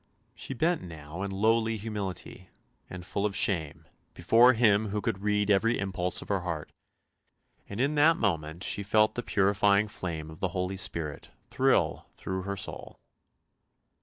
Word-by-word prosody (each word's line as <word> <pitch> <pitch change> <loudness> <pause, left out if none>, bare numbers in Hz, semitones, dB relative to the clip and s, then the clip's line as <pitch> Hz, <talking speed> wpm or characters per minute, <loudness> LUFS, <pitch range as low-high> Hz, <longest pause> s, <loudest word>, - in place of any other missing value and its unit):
She 135 - -6
bent 165 +7 +1
now 80 0 -9
in 100 - -3
lowly 110 +3 +1
humility, 100 -3 -6 0.4
and 90 -1 -8
full 100 +1 -3
of 105 -1 -1
shame, 85 -8 0 0.3
before 115 +8 +5
Him 110 -2 +3
who 105 +1 -2
could 95 - -2
read 105 0 +1
every 115 +4 +2
impulse 90 -2 0
of - - -16
her 100 -1 +1
heart; 85 -4 -5 1.0
and 100 - -6
in 140 +4 +1
that 155 +2 +4
moment 80 - -2
she 100 - -1
felt 105 +2 +2
the 120 - -3
purifying 100 0 +2
flame 80 -6 -5
of 80 - -13
the 95 - 0
Holy 90 +1 -2
Spirit 80 -6 -2 0.2
thrill - - +1
through 95 0 -4
her 100 - -3
soul. 95 - -5
100 Hz, 160 wpm, -28 LUFS, 90-110 Hz, 1.0 s, before